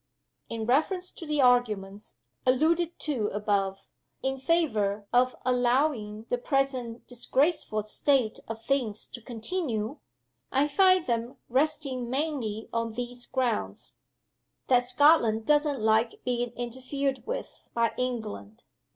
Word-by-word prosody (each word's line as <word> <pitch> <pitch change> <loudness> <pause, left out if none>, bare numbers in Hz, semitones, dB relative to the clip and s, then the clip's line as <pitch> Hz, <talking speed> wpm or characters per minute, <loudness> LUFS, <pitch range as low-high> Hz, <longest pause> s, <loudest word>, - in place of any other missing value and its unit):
In 225 -1 -3
reference 320 - +1
to 330 - -10
the 300 -1 +1
arguments 210 -5 +1 0.3
(alluded 320 +6 +2
to 255 -9 -1
above) 200 -2 -1 0.4
in 265 0 -1
favor 215 -10 +1
of 255 +1 +3
allowing 245 -3 +1
the 245 - +1
present 255 -3 -1
disgraceful 250 -2 +1
state 235 +2 +1
of 225 0 -6
things 245 -7 0
to 240 - -10
continue, 235 - -3 0.5
I 275 +2 +3
find 370 +2 +5
them 235 0 -2
resting 265 -2 0
mainly 260 -6 -2
on 230 -1 -1
these 245 +1 -5
grounds: 255 -4 -2 0.8
That 245 -1 +4
Scotland 245 -5 +4
doesn't 295 -2 +2
like 220 +2 +2
being 245 -1 0
interfered 260 - -3
with - - -5 0.2
by 230 -1 +2
England 220 - -4
245 Hz, 115 wpm, -28 LUFS, 225-280 Hz, 0.8 s, find